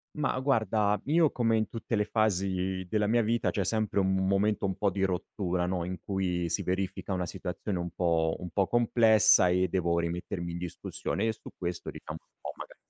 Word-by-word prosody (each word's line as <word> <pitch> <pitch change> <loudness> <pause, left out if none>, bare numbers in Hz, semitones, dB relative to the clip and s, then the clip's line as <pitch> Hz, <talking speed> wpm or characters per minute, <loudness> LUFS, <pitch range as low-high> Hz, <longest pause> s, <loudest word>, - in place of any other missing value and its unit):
Mah, 150 -4 -1
guarda, 110 -6 +1
io, 155 +1 +3
come 115 -2 +1
in 110 - 0
tutte 115 0 -3
le 105 -1 +1
fasi 95 -3 0
della 105 +1 +1
mia 115 +1 +3
vita, 115 +2 +1
c'è 100 - -1
sempre 110 0 +1
un 95 0 +2
momento 100 +1 +1
un 95 - -2
po' 100 -2 +1
di 95 +1 -2
rottura, 90 -1 -1
no, 90 -1 -1
in 90 +1 -4
cui 90 -3 -1
si - - 0
verifica 95 +1 -2
una 90 -1 -1
situazione 90 +2 -4
un 85 - -3
po' 80 -2 +1
un 90 -1 -8
po' 95 +2 +1
complessa 110 -4 +5
e 90 +1 +2
devo 85 -2 +1
rimettermi 85 +1 -3
in 85 - -5
discussione 90 +5 -3
e 115 - +2
su 110 - -12
questo 90 -1 -4
diciamo - - -8
un - - -41
po' - - -6
maga - - -10
95 Hz, 200 wpm, -29 LUFS, 90-110 Hz, -, complessa